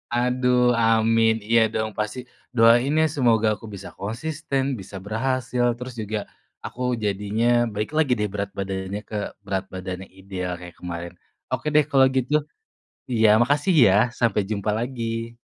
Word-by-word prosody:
Aduh 125 Hz, 0 st, +2 dB
amin, 115 Hz, 0 st, +3 dB
iya 115 Hz, 0 st, +5 dB
dong 110 Hz, -1 st, -2 dB
pasti. 105 Hz, +3 st, -3 dB, 0.4 s
Doain 120 Hz, +3 st, +5 dB
ya 160 Hz, -, +4 dB
semoga 115 Hz, -5 st, +3 dB
aku -, -, -20 dB
bisa 95 Hz, -2 st, -9 dB
konsisten, 135 Hz, +7 st, -3 dB, 0.2 s
bisa 95 Hz, +1 st, -10 dB
berhasil, 125 Hz, +3 st, -1 dB
terus 125 Hz, 0 st, -7 dB
juga 110 Hz, +1 st, -3 dB, 0.5 s
aku 125 Hz, -, -7 dB, 0.2 s
jadinya 105 Hz, +3 st, -1 dB, 0.3 s
balik 105 Hz, +6 st, -3 dB
lagi, 155 Hz, -5 st, +2 dB
deh, 105 Hz, -, +1 dB
berat 100 Hz, -1 st, -3 dB
badannya 95 Hz, 0 st, -3 dB
ke 110 Hz, -, -7 dB, 0.3 s
berat 95 Hz, -1 st, -2 dB
badannya 95 Hz, 0 st, -6 dB
ideal 95 Hz, -2 st, -4 dB
kayak 90 Hz, -2 st, -11 dB
kemarin. 85 Hz, -1 st, -6 dB, 0.4 s
Oke, -, -, -2 dB
deh, 150 Hz, -1 st, +6 dB
kalau 135 Hz, -1 st, +6 dB
gitu. 130 Hz, +2 st, 0 dB, 0.8 s
Iya 110 Hz, -2 st, +4 dB
makasih 145 Hz, +8 st, +2 dB
ya 95 Hz, -, +5 dB, 0.2 s
sampai 115 Hz, -3 st, +2 dB
jumpa 105 Hz, 0 st, -2 dB
lagi. 115 Hz, -1 st, -4 dB
115 Hz, 145 wpm, -23 LUFS, 100-125 Hz, 0.8 s, deh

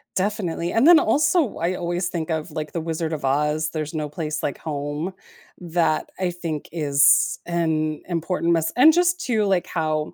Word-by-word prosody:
definitely 185 Hz, -4 st, -2 dB
and 235 Hz, +7 st, +3 dB
then 345 Hz, -, +9 dB
also, 310 Hz, -, +2 dB
I 170 Hz, +2 st, -1 dB
always 175 Hz, 0 st, -2 dB
think 170 Hz, -2 st, -4 dB
of, 160 Hz, 0 st, -3 dB
like, 155 Hz, -1 st, -5 dB
the 170 Hz, -, -3 dB
Wizard 160 Hz, 0 st, -3 dB
of 150 Hz, -3 st, -4 dB
Oz, 150 Hz, +3 st, 0 dB
"There's 155 Hz, 0 st, -4 dB
no 155 Hz, -2 st, -2 dB
place 155 Hz, 0 st, -4 dB
like 140 Hz, -, -2 dB
home," 150 Hz, +3 st, -4 dB, 0.5 s
that, 165 Hz, -3 st, 0 dB
I 185 Hz, -1 st, 0 dB
think, 165 Hz, -4 st, -5 dB
is 145 Hz, -3 st, +3 dB
an 160 Hz, -3 st, -1 dB
important 170 Hz, 0 st, 0 dB
mess 165 Hz, -1 st, 0 dB
And 305 Hz, +6 st, +7 dB
just 355 Hz, +1 st, +2 dB
to 225 Hz, -5 st, +1 dB
like, 190 Hz, -3 st, +1 dB
how 155 Hz, -2 st, -2 dB
165 Hz, 180 wpm, -23 LUFS, 155-180 Hz, 0.5 s, then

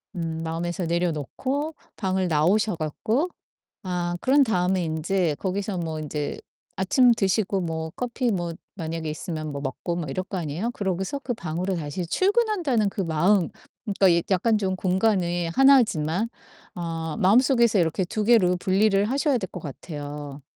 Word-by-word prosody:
음 165 Hz, -1 st, -3 dB
마음에서 170 Hz, +2 st, -3 dB
내려 170 Hz, +1 st, +1 dB
놓고 270 Hz, -, -3 dB, 0.2 s
방을 190 Hz, -2 st, 0 dB
나오셔 185 Hz, +7 st, +2 dB
갖고 215 Hz, -, -1 dB, 0.6 s
아 175 Hz, -1 st, -2 dB
그런 280 Hz, +2 st, +5 dB
다음에 185 Hz, -4 st, +1 dB
인제 160 Hz, 0 st, 0 dB
거기서 195 Hz, 0 st, -2 dB
뭐 160 Hz, -2 st, -3 dB
인제 150 Hz, -1 st, -4 dB, 0.4 s
아침 240 Hz, +6 st, +4 dB
드시고 195 Hz, -1 st, +1 dB
뭐 160 Hz, -2 st, -3 dB
커피 245 Hz, -1 st, -1 dB
뭐 175 Hz, -3 st, -2 dB, 0.2 s
만약에 165 Hz, -3 st, -4 dB
있으면 155 Hz, -1 st, -4 dB
뭐 140 Hz, -, -4 dB
먹고 140 Hz, +5 st, -3 dB
막 160 Hz, -5 st, -4 dB
이럴 185 Hz, +7 st, -2 dB
거 190 Hz, -, -5 dB
아니에요. 170 Hz, +8 st, -2 dB
그러고서 190 Hz, +6 st, -2 dB
그 255 Hz, -3 st, -3 dB
방으로 180 Hz, 0 st, -3 dB
다시 165 Hz, +2 st, -4 dB
출근한다는 375 Hz, -, +2 dB
그 195 Hz, -, -3 dB
마음 175 Hz, +3 st, +2 dB, 0.4 s
그러니까 200 Hz, -2 st, +3 dB
이 170 Hz, -1 st, +3 dB
약간 215 Hz, +4 st, +3 dB
좀 190 Hz, -2 st, -1 dB
공간이 180 Hz, -3 st, +1 dB
하나지만 225 Hz, -, +4 dB, 0.5 s
아 165 Hz, -2 st, -4 dB
마음속에서 235 Hz, +1 st, +4 dB
이렇게 170 Hz, +2 st, +1 dB
2 210 Hz, +4 st, -2 dB
개로 200 Hz, -6 st, +5 dB
분리를 195 Hz, +2 st, +2 dB
하셔야 275 Hz, +2 st, +1 dB
될 190 Hz, -5 st, -5 dB
것 180 Hz, -, -6 dB
같아요. 145 Hz, -1 st, -7 dB
185 Hz, 325 characters per minute, -25 LUFS, 165-215 Hz, 0.6 s, 그런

